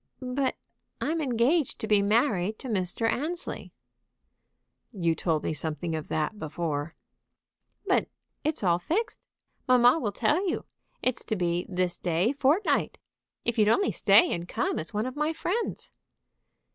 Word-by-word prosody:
"But 270 0 0 0.4
I'm 320 +1 -1
engaged 265 +3 +1
to 220 - -4
be 210 -2 +4
married 210 -2 +2
to 265 - -8
Mr. 200 0 0
Annesley." 320 +9 -3 1.2
"You 170 -7 +1
told 160 -1 -1
me - - -1
something 160 +2 -3
of 155 - -5
that 160 +7 -2
before." 155 -1 -3 0.9
"But - - +2 0.3
it's 310 -6 -1
all 175 -2 +3
fixed. 365 - -2 0.5
Mamma 250 +3 +6
will 215 -7 -1
tell 350 - +1
you. - - -3 0.4
It's 255 -2 0
to 220 - -1
be 175 -2 -1
this 180 -1 -1
day 180 +8 +1
fortnight. 290 +8 +2 0.5
If 235 -1 0
you'd 210 -1 +5
only 395 - +3
stay 350 - +5
and 170 0 -4
come - - -1
as 160 - -5
one 210 +1 -1
of 255 - -5
my 300 +2 0
friends." 360 +8 -3
220 Hz, 145 wpm, -28 LUFS, 175-285 Hz, 1.2 s, Mamma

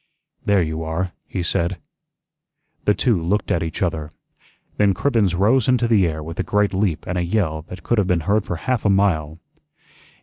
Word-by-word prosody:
"There 100 -3 +3
you 80 0 -3
are," 80 +3 -2 0.2
he 90 - -3
said. 85 +2 0 1.1
The 105 - +3
two 115 -9 +1
looked 95 +5 0
at 85 - +1
each 80 +3 -3
other. 80 -4 -2 0.7
Then 100 -2 +3
Cribbens 110 -7 +1
rose 110 +6 +3
into 125 -2 +3
the 105 -6 +4
air 80 -1 -4
with 80 +2 -8
a - - +1
great 105 -1 +1
leap 95 -4 0
and 90 0 -2
a - - 0
yell 85 -4 0
that 90 - -9
could 120 - +1
have 100 - +1
been 90 -3 +1
heard 100 +5 +1
for 90 - -4
half 125 +7 -1
a 105 - +2
mile. 85 -6 +1
95 Hz, 195 wpm, -21 LUFS, 85-105 Hz, 1.1 s, the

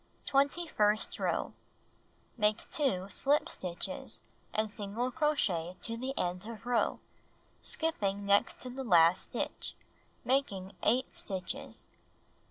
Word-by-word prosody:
Twenty 280 +5 +2
first 210 -8 +2
row: - - 0 0.8
Make 210 -1 +1
2 200 -10 +1
slip 285 +9 +2
stitches, 175 -2 -4 0.3
and 215 -1 -1
single 225 +4 -2
crochet 190 - +1
to 230 - -2
the 260 +3 -4
end 180 +3 -1
of 230 0 -8
row, 245 -2 +1 0.6
skipping 205 -11 0
next 200 0 +4
to 250 - -5
the 265 +2 -4
last 175 -5 +6
stitch, - - -2 0.5
making 200 -8 +1
^|P) - - -15
» - - -29
J - - +4 0.2
8 - - -26
stitches. 190 -3 -4
215 Hz, 130 wpm, -32 LUFS, 190-265 Hz, 0.8 s, last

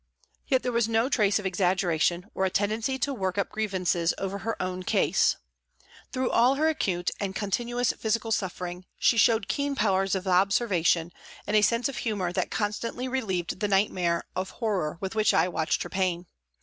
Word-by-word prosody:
Yet 260 -3 +2
there 250 - -1
was 235 -1 +1
no 225 +3 +2
trace 210 -6 +3
of 205 - -5
exaggeration 180 -2 +1
or 190 - -1
a 190 - +2
tendency 215 +7 0
to 280 +1 -1
work 190 -5 -2
up 200 - 0
grievances 185 -5 0
over 195 +1 -3
her 225 +3 -3
own 185 0 -3
case. 180 - +2 0.8
Through 255 0 -1
all 245 +4 +4
her 310 +3 +2
acute 180 - -1
and 195 -2 -3
continuous 240 +5 0
physical 225 +1 -2
suffering 180 -3 -3
she - - +3
showed 225 -2 +3
keen 280 +2 -1
powers 195 -4 +1
of 190 0 -3
observation 180 -3 +2 0.3
and 210 - -1
a 210 - +6
sense 230 +3 +2
of 275 - -6
humour 195 -6 -2
that - - -1
constantly 225 +4 -2
relieved 195 -10 -2
the 210 - 0
nightmare 185 -4 +1
of 185 +1 -2
horror 190 -9 -2
with 190 +1 -3
which 215 -1 +2
I - - +4
watched 160 -3 -1
her - - -8
pain. 185 -2 -1
200 Hz, 180 wpm, -27 LUFS, 185-230 Hz, 0.8 s, a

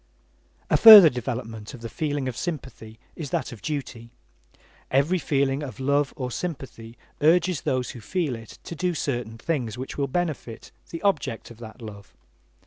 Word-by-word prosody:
A - - +5
further 210 -8 +11
development 115 -1 -5
of 120 - -13
the 115 - -5
feeling 145 +3 -3
of 125 - -4
sympathy 130 -10 -6 0.2
is 155 -4 -6
that - - -2
of 115 -4 -11
duty. 130 -6 -5 0.8
Every 145 +8 +2
feeling 140 -2 0
of 140 -2 -7
love 140 +1 +1
or 125 -2 -4
sympathy 125 -8 -6 0.2
urges 175 0 +3
those 130 -1 -1
who 120 - -11
feel 155 - -2
it 115 -1 -12
to - - -7
do 180 +1 -1
certain 120 -6 -3
things 120 -5 -3
which 130 +3 -6
will 140 - 0
benefit 150 -6 -4 0.2
the 165 - -7
object 150 - -1
of 115 - -14
that 115 +1 -11
love. 100 -3 -11
135 Hz, 165 wpm, -25 LUFS, 115-155 Hz, 0.8 s, further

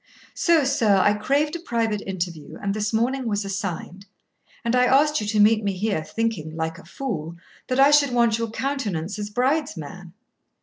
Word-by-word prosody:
So, 335 -3 +3
sir, 240 -8 +3
I 205 +2 +4
craved 280 +9 0
a - - -4
private 230 - -1
interview, 175 -5 -5
and 200 -1 -2
this 215 0 -2
morning 245 +3 0
was 205 -2 -1
assigned; 195 -1 -5 0.6
and 235 +1 +1
I 250 0 +4
asked 290 +2 +3
you 210 - -4
to 210 0 0
meet 215 +1 +5
me 200 -1 0
here, 195 -4 -1
thinking, 175 -6 -3
like 160 +1 -3
a - - -15
fool, 170 - -5 0.3
that 255 +1 -1
I 275 +2 +7
should 295 -1 +5
want 235 -2 +2
your 230 -1 -2
countenance 215 - -3
as 205 0 -4
bride's 260 - 0
man. 170 +3 -9
215 Hz, 185 wpm, -23 LUFS, 195-260 Hz, 0.6 s, I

